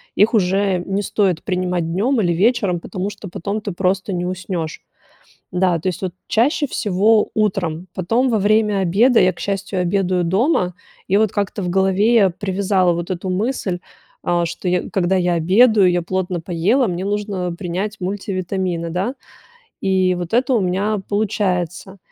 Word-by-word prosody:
их 210 +4 +4
уже 195 -2 +2
не 195 +1 -1
стоит 195 -5 0
принимать 180 -3 -1
днем 225 +10 +1
или 175 -5 +2
вечером, 195 -2 +1
потому 195 0 -4
что 205 -1 -9
потом 200 +4 -4
ты 205 -1 -4
просто 190 +2 -1
не 175 -1 -2
уснешь. 180 -3 -4 0.7
Да, 180 -1 +2
то 175 - -2
есть, 180 - -4
вот, 185 -2 -2
чаще 285 +6 +2
всего 210 -2 +2
утром, 185 -5 -1
потом 230 +8 +1
во 225 - +2
время 210 0 +2
обеда, 215 +7 +4
я, 185 0 +4
к - - -18
счастью, 195 -1 -2
обедаю 180 -1 +1
дома, 185 - +1 0.3
и, 195 - +2
вот, 220 -2 +2
как-то 205 -1 -2
в 180 - -2
голове 195 +4 +2
я 200 -5 +5
привязала 190 0 +1
вот 170 +1 -4
эту 185 +1 -4
мысль, 195 -2 -1 0.5
а, 175 0 +1
что 175 +2 -4
я 180 0 0
когда 190 -1 +1
я 180 -1 +1
обедаю, 195 +4 +4
я 175 0 0
плотно 180 0 -2
поела, 190 +9 +1
мне 180 +1 -3
нужно 200 -3 -2
принять 195 +4 -4
мультивитамины, 185 -3 -3
да, 190 +9 -2 0.7
и 185 -1 +2
вот 175 +4 -4
это 255 +2 +2
у 230 - +3
меня 195 +3 0
получается. 190 -3 -1
190 Hz, 165 wpm, -19 LUFS, 180-205 Hz, 0.7 s, я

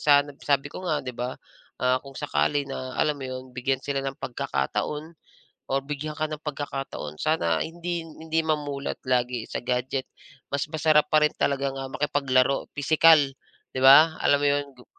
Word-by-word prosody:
san 145 -1 +5 0.2
sabi 140 -1 +1
ko - - -6
nga, 155 -4 0
'di 125 - -4
ba? 125 +2 -4 0.4
Ah, 125 0 +1
kung 135 0 -13
sakali 145 -1 0
na 130 -1 -6
alam 150 - +2
mo - - -5
'yon, 130 0 -5
bigyan 130 +1 -1
sila 140 -1 -1
ng 135 0 -4
pagkakataon 150 - -3 0.6
or 135 - +2
bigyan 150 +2 -5
ka 155 - 0
ng 155 -1 -6
pagkakataon, 140 - -5
sana 85 - +1
hindi 170 0 -4
hindi 160 0 -3
mamulat 145 -3 -2
lagi 125 -2 0
sa - - -3
gadget. 125 +2 -1 0.5
Mas 140 +1 -1
masarap 155 -1 +3
pa 155 -1 +4
rin 150 - 0
talaga 140 0 0
nga 135 0 -5
makipaglaro 135 -1 +1
pisikal 160 +3 +6 0.6
'di - - -2
ba, 145 +5 +8
alam 145 - +4
mo 145 - -1
'yon? 145 0 +1
Gu 125 - -16
140 Hz, 170 wpm, -26 LUFS, 130-150 Hz, 0.6 s, ba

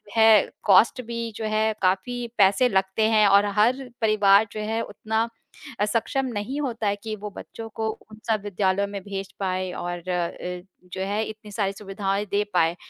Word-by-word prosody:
है 220 -2 +6 0.2
कॉस्ट 215 +5 +5
भी 235 0 -4
जो 220 - -4
है 215 0 +1
काफ़ी 240 +7 0
पैसे 200 +5 +5
लगते 190 +1 +1
हैं 215 -2 +5
और 200 +1 +5
हर 250 +5 +2
परिवार 210 -1 +5
जो 215 - -6
है, 220 +2 -1
उतना 220 +1 -2 0.5
अ, 205 - +3
सक्षम 235 +5 0
नहीं 215 +7 -3
होता 235 -6 -2
है 200 - +1
कि 220 -1 -3
वो 210 0 -7
बच्चों 225 - -8
को 220 0 -1 0.2
उन 215 - -12
सब 215 -2 +2
विद्यालयों 200 0 0
में 200 -1 -6
भेज 195 -1 -6
पाए 185 -1 -1
और 175 0 -4
अ, 180 0 -3 0.3
जो 190 - -4
है 205 +2 -1
इतनी 215 -1 -9
सारी 200 -1 -1
सुविधाएँ 195 0 -2
दे 205 +1 +2
पाए। 165 -1 +3
210 Hz, 180 wpm, -24 LUFS, 195-220 Hz, 0.5 s, है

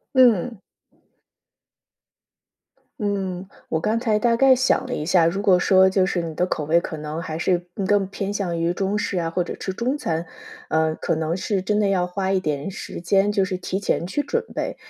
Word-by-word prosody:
嗯。 240 -4 +4 2.4
嗯， 190 -2 -2 0.2
我 160 - 0
刚 220 +6 0
才 225 -3 +1
大 230 +2 +2
概 270 +2 +6
想 260 +1 +1
了 - - -6
一 150 - -4
下， 175 -1 +4
如 170 +4 0
果 195 -3 +4
说 190 +1 +5
就 190 0 +2
是 185 -1 -1
你 165 -2 -5
的 180 - +1
口 155 -4 -3
味 165 +3 +4
可 160 - -6
能 155 +2 -5
还 160 -3 -5
是 175 0 0 0.2
更 205 -2 +3
偏 195 0 -4
向 180 -5 -2
于 170 +1 0
中 195 +3 -1
式 195 -2 -1
啊， 165 -1 -1
或 180 +2 0
者 175 - -6
吃 190 - -4
中 245 +8 -1
餐， 170 - -2 0.4
呃， 160 0 +1
可 - - -1
能 160 +1 -1
是 190 +1 -1
真 210 +2 +1
的 205 - +2
要 180 -2 +1
花 190 +1 -2
一 190 -1 +2
点 150 0 -2
时 195 - -7
间 195 +3 +2
就 200 -2 +2
是 190 -1 -1
提 190 +1 -3
前 175 - -1
去 290 +10 -1
准 460 - -2
备， - - -3
190 Hz, 220 characters per minute, -23 LUFS, 170-205 Hz, 2.4 s, 概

